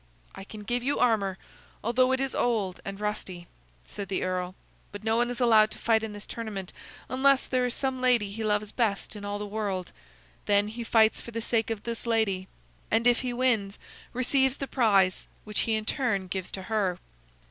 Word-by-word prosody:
"I - - -9
can 210 +1 -10
give 240 +3 -1
you 275 +4 0
armor, 200 -5 +2 0.5
although 255 +3 +3
it 260 - +2
is 270 0 -1
old 210 -6 0
and 195 0 -6
rusty," 200 -4 -3 0.4
said 200 -2 -7
the 195 - -1
earl. 185 0 -2 0.4
"But 205 +1 -8
no 220 0 +2
one 240 +1 +2
is 245 - -4
allowed 220 -3 +6
to - - -10
fight 225 -1 +2
in 220 -1 -4
this 205 0 -8
tournament 205 -5 -6 0.3
unless 265 +2 +3
there 255 -1 +1
is 245 - -3
some 265 -2 -2
lady 240 -6 +3
he 220 +2 -5
loves 210 -1 0
best 215 -3 -1
in 205 - -8
all 205 0 -3
the 210 - -4
world. 200 -3 -3 0.6
Then 205 0 +3
he 235 +2 -5
fights 225 -1 +4
for - - -9
the 230 -1 -4
sake 225 -1 0
of 220 -2 -3
this 235 0 -5
lady, 205 -5 +1 0.4
and 225 +1 +2
if 245 -1 +4
he 250 -2 -2
wins, 235 -5 +1 0.3
receives 265 +1 +2
the 275 - -3
prize, 200 -9 +2 0.2
which 210 -1 -3
he 220 - +3
in 215 0 -2
turn 220 -8 0
gives 185 0 -4
to 190 - -4
her." 195 -4 0
220 Hz, 200 wpm, -28 LUFS, 200-240 Hz, 0.6 s, allowed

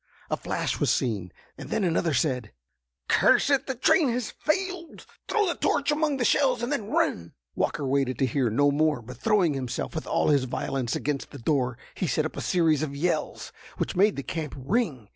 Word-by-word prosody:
A - - +3
flash - - -2
was - - +1
seen, 100 -8 0 0.3
and - - -8
then 210 - 0
another 165 -3 +1
said: 125 -8 0 0.6
"Curse - - +4
it, 275 -1 +2
the 265 - -2
train 270 +4 +3
has 245 -1 -2
failed. 365 +1 -3 0.2
Throw 425 -1 +2
the 345 - 0
torch 290 -3 +1
among 300 -1 +1
the 245 - 0
shells, 260 -3 +2
and 240 - -2
then 210 -1 -2
run!" 85 - 0 0.2
Walker 145 - -1
waited 135 -2 0
to 135 - +2
hear 130 -1 0
no 145 +6 +3
more, 150 -3 +1
but 125 +2 -10
throwing 190 - +2
himself 130 -3 -4
with - - -5
all - - +1
his 140 -3 +3
violence 130 -1 -2
against 145 -2 -2
the - - -10
door, 125 -2 0 0.2
he 180 - -2
set 155 - 0
up 155 - -5
a - - -4
series 165 -5 +2
of 145 -3 -3
yells, 170 +5 -2 0.3
which - - -2
made 200 +3 +4
the 140 - -4
camp 155 -1 -4
ring. 140 - -1
155 Hz, 200 wpm, -26 LUFS, -, 0.6 s, Curse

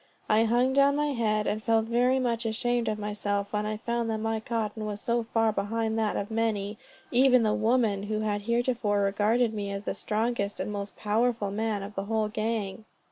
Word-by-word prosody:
I 220 +1 +4
hung 245 +3 +2
down 280 +1 +4
my 295 0 +1
head, 215 -5 0
and 215 - -1
felt 225 0 +2
very 245 +3 +2
much 240 -3 0
ashamed 240 +1 0
of 215 - 0
myself 205 -1 -2
when 210 0 0
I 215 0 -2
found 235 +1 -2
that 220 - 0
my 225 0 -1
cotton 220 -1 -3
was 205 -1 -4
so 235 +2 0
far 225 -1 +3
behind 220 +2 -1
that 215 -2 0
of 200 - -4
many, 215 -2 -1 0.3
even 255 -1 +5
of 215 - +3
the - - +1
women, 225 -5 +2
who 215 0 -1
had 205 -1 -1
heretofore 235 -2 +1
regarded 215 +4 +2
me 205 -2 -3
as 200 0 -4
the - - -2
strongest 215 -2 -2
and - - -3
most 200 -1 -5
powerful 220 -1 0
man 215 -1 -1
of 200 +1 -8
the 195 -1 -3
whole 220 0 0
gang. 215 -2 -3
220 Hz, 205 wpm, -28 LUFS, 210-235 Hz, 0.3 s, even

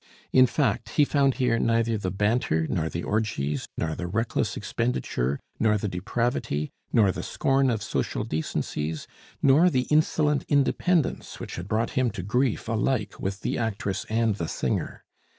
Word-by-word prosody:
In 130 0 +7
fact, 140 +3 0
he 150 - +6
found 140 -2 +2
here 125 -4 +1
neither 115 0 +2
the 100 -3 -2
banter, 100 -4 +1
nor 80 -2 -1
the 85 - -4
orgies, 75 -10 -1
nor 80 -1 -1
the 90 +2 -4
reckless 115 +6 -1
expenditure, 70 - -1 0.2
nor 110 -1 +3
the 105 - -2
depravity, 95 - -2 0.2
nor 105 -4 +4
the - - -5
scorn 135 0 +1
of 110 -4 -1
social - - -2
decencies, 80 0 -3 0.4
nor 145 +6 +6
the 130 -5 +1
insolent 150 -1 +3
independence 150 +4 +1
which - - -6
had 85 +2 -6
brought 110 +2 0
him 130 -1 +1
to 95 - -6
grief 125 +5 0
alike 110 -1 -1
with 95 +1 -3
the - - -1
actress 100 -4 -2
and 110 -2 +1
the 85 - -3
singer. - - -2
110 Hz, 160 wpm, -26 LUFS, 95-130 Hz, 0.4 s, In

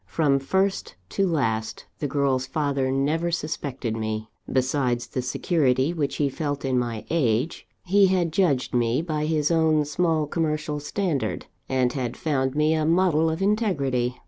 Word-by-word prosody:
From 145 -4 +2
first 190 +8 -1
to 195 - +1
last, 110 -9 -1
the 145 - -1
girl's 135 -2 0
father 140 -1 0
never 150 +6 0
suspected 140 -8 -3
me. 110 0 -3 0.2
Besides 130 -2 +1
the 130 - -3
security 130 +2 +1
which 145 -5 -2
he 145 - +1
felt 145 0 -3
in 130 -1 +1
my 115 -3 -3
age, 130 -2 0 0.2
he 195 +2 +5
had 180 -4 +1
judged 160 -9 +1
me 120 +4 +1
by 155 -2 -2
his 155 -1 +1
own 160 -2 +3
small 160 +1 +1
commercial 155 -1 -2
standard, 155 -1 -2 0.2
and 130 -2 +1
had 125 -3 -3
found 135 -3 -1
me 150 +1 +3
a 155 -1 +1
model 165 -1 +3
of 160 +4 -2
integrity. 140 - 0
145 Hz, 155 wpm, -25 LUFS, 130-160 Hz, 0.2 s, he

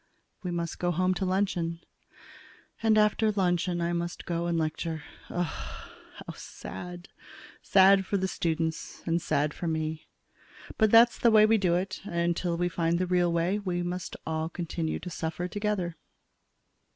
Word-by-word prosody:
We 180 - -4
must 170 -1 -3
go 175 - +1
home 185 +2 +2
to 190 +1 -2
luncheon. 180 -3 0 1.0
And 220 -1 +4
after 215 +1 +3
luncheon 175 -3 0
I 170 +1 0
must 170 0 -3
go 170 0 -1
and 170 -1 0
lecture 160 0 -2 0.3
Ugh! 175 0 0
How - - -9
sad! 175 - -9 0.5
sad 195 0 +6
for 200 - +1
the 190 0 0
students 165 -2 -2
and 170 0 +1
sad 150 -3 0
for 175 - -4
me. 160 -1 -2 0.7
But 220 -1 +5
that's 230 +2 +6
the 235 - +5
way 215 -1 +7
we 220 0 +4
do 180 -3 +2
it, 185 +1 -2
and 190 -4 -7
until 170 0 0
we 175 +1 +1
find 170 -1 0
the 185 - 0
real 175 -1 +2
way, 170 +4 +1
we 180 -3 -2
must 180 +1 -4
all 160 0 -2
continue 170 -1 -3
to 180 - -7
suffer 165 +2 -3
together. 205 -4 -2
175 Hz, 165 wpm, -28 LUFS, 170-190 Hz, 1.0 s, way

